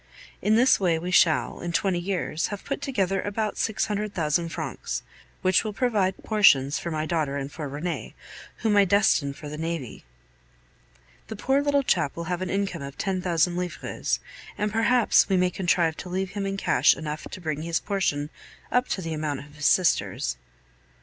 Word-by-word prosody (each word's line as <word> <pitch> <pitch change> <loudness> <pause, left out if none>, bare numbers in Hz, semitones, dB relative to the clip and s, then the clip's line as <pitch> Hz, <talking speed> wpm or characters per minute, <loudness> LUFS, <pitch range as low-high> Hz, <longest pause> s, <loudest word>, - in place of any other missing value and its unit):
In 210 +3 +3
this 250 +3 +5
way 175 -4 +2
we 175 +3 -4
shall, 165 -3 +3
in 175 -1 -4
twenty 185 +1 +1
years, 175 -3 -2
have 205 -1 -7
put 275 - -3
together 195 -8 0
about 210 +1 -2
six 220 -1 0
hundred 210 0 -3
thousand 165 +1 0
francs, - - -4 0.4
which 185 -1 +4
will 215 -2 -4
provide 200 -4 +1
portions 160 -9 +4
for 170 - -4
my 155 -1 -2
daughter 155 -4 -1
and 140 0 -5
for 150 -2 -6
Rene, 155 +5 -4 0.5
whom 215 -2 +3
I 200 - +7
destine 195 -7 +3
for 150 +2 -10
the 150 +1 -6
navy. 165 -6 -4 1.2
The 220 - -6
poor 265 +6 +1
little 285 -1 +2
chap 155 - +1
will 170 - -4
have 175 - -3
an 185 - -2
income 195 -4 -2
of 140 0 -8
ten 190 -2 -1
thousand 175 0 +1
livres, 180 -2 -2 0.4
and 210 0 -1
perhaps 225 +2 +4
we 190 - +3
may 180 0 +2
contrive 170 -3 +1
to 180 - -7
leave 190 +1 -2
him 200 -1 -3
in 195 0 -3
cash - - +4
enough 150 -1 -5
to - - -8
bring 155 -4 -3
his 170 +1 -1
portion 160 -7 -1 0.4
up 250 +1 +2
to 190 - -2
the 165 -1 -3
amount 150 -3 -2
of 145 +1 -14
his 145 -2 0
sister's. 115 - +2
180 Hz, 190 wpm, -26 LUFS, 155-200 Hz, 1.2 s, I